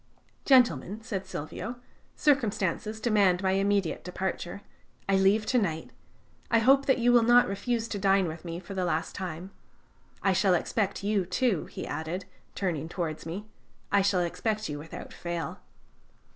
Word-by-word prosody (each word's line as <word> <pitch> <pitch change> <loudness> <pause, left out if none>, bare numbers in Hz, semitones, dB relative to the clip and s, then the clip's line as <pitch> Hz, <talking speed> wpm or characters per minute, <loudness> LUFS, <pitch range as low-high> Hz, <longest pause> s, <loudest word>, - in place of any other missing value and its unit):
"Gentlemen," 240 -5 +3
said 195 -5 -4
Silvio, 190 +8 -5 0.4
"circumstances 220 - +1
demand 200 -5 +3
my 190 - +2
immediate 195 -2 +1
departure; 185 +1 -4 0.4
I 195 - +3
leave 195 +3 +3
to 250 +3 +2
night. 160 -7 -2 0.6
I 230 - +4
hope 270 +4 +4
that 265 - +4
you 245 0 +3
will 240 - +7
not 240 +2 +6
refuse 230 +4 -2
to 205 - -3
dine 195 -1 +3
with 160 0 -7
me 170 -1 -5
for 190 +2 -9
the 190 -1 -1
last 165 -2 -1
time. 185 0 -6 0.7
I 195 - +3
shall 185 0 +3
expect 200 +3 -1
you, 205 -1 +1
too," 195 -1 +1
he - - -7
added, 160 +5 -4 0.3
turning 165 -5 -2
towards 160 -3 -4
me. 190 +6 -5 0.5
"I 200 - +5
shall 190 -2 +2
expect 215 +5 -1
you 145 -1 -5
without 160 +2 -9
fail." 170 -1 -4
195 Hz, 160 wpm, -28 LUFS, 175-220 Hz, 0.7 s, will